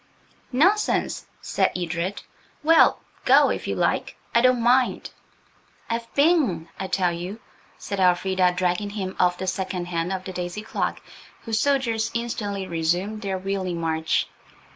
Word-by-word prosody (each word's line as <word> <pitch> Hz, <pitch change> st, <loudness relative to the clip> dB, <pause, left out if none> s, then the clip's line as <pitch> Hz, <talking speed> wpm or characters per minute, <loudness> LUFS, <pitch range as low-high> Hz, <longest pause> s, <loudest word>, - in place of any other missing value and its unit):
"Nonsense," 380 Hz, +11 st, +2 dB
said -, -, +1 dB
Edred. 175 Hz, +2 st, -3 dB, 0.4 s
"Well, 325 Hz, +1 st, +5 dB, 0.2 s
go -, -, +6 dB
if -, -, -4 dB
you -, -, -1 dB
like; -, -, 0 dB, 0.2 s
I 235 Hz, -, +5 dB
don't 255 Hz, 0 st, +4 dB
mind." 250 Hz, +2 st, +2 dB, 0.8 s
"I've 230 Hz, 0 st, -3 dB
been, 280 Hz, -, +2 dB
I 190 Hz, -, -3 dB
tell 185 Hz, -2 st, +1 dB
you," 180 Hz, +6 st, -6 dB, 0.4 s
said 200 Hz, -, -5 dB
Elfrida, 185 Hz, 0 st, +3 dB
dragging 180 Hz, +3 st, 0 dB
him 195 Hz, -2 st, -4 dB
off 180 Hz, -1 st, +3 dB
the 190 Hz, -, -4 dB
second 185 Hz, -1 st, -3 dB
hand 170 Hz, +1 st, -1 dB
of 190 Hz, -1 st, -3 dB
the 185 Hz, -, -7 dB
daisy 180 Hz, +3 st, -4 dB
clock, 220 Hz, -, -2 dB, 0.4 s
whose 225 Hz, -2 st, -1 dB
soldiers 230 Hz, -5 st, +1 dB
instantly 205 Hz, -4 st, -3 dB
resumed 175 Hz, +5 st, -1 dB
their 195 Hz, -2 st, -2 dB
wheeling 185 Hz, -2 st, -3 dB
march. 160 Hz, -1 st, 0 dB
190 Hz, 140 wpm, -24 LUFS, 180-230 Hz, 0.8 s, go